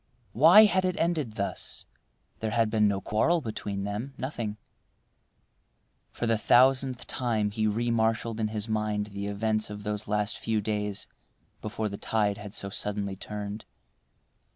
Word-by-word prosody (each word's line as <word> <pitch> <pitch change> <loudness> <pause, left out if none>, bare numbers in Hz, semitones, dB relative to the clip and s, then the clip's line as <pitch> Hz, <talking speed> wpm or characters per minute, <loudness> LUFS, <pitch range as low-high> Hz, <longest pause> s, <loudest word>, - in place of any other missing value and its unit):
Why 170 - +8
had 190 -2 +2
it 185 -1 -1
ended 160 -9 0
thus? 100 -2 -4 0.5
There 110 - -2
had 115 0 +1
been 105 -1 +4
no 100 -1 0
quarrel 160 - +2
between 105 -6 -4
them, 105 +7 -4
nothing— 115 -6 -4 1.5
For - - -3
the 115 -2 +2
thousandth 130 +2 +4
time 110 -5 -1
he 110 +1 0
remarshalled 115 0 0
in 110 - +1
his 105 0 -3
mind 105 -1 -1
the 100 0 -4
events 110 +1 0
of 105 0 -7
those 105 0 -3
last 105 0 0
few 110 -1 0
days 105 -1 -2 0.5
before 110 0 -3
the 100 -1 -6
tide 105 -2 0
had 105 -1 -8
so 100 - -2
suddenly 100 -1 -2
turned. 105 +1 -6
110 Hz, 150 wpm, -28 LUFS, 105-115 Hz, 1.5 s, Why